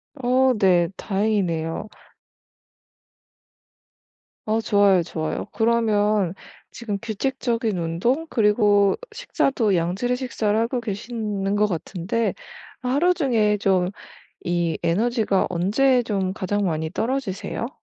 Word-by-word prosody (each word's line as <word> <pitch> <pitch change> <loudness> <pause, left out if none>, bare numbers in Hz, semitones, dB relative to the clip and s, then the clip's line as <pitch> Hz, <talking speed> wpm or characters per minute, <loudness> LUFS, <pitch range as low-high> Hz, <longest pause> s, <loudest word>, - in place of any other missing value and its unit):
어 260 0 +2
네. 180 -4 +3
다행이네요. 195 -4 -1 2.6
어 220 +1 +1
좋아요, 200 -5 +3
좋아요. 155 -1 -4
그러면 215 -5 +2 0.4
지금 215 -4 -4
규칙적인 230 -2 -2
운동 180 - 0
그리고 210 -4 +3 0.2
식사도 225 -8 0
양질의 190 +9 0
식사를 220 -5 -1
하고 240 +2 -1
계시는 205 -2 -3
것 210 0 +3
같은데 190 +5 -2 0.5
하루 285 +9 +2
중에 225 -10 +1
좀 185 -2 +1 0.6
이 170 -2 0
에너지가 210 +2 +1
언제 245 +9 +2
좀 195 -4 -1
가장 205 0 -1
많이 160 -2 -1
떨어지세요? 230 0 -3
210 Hz, 230 characters per minute, -23 LUFS, 185-235 Hz, 2.6 s, 네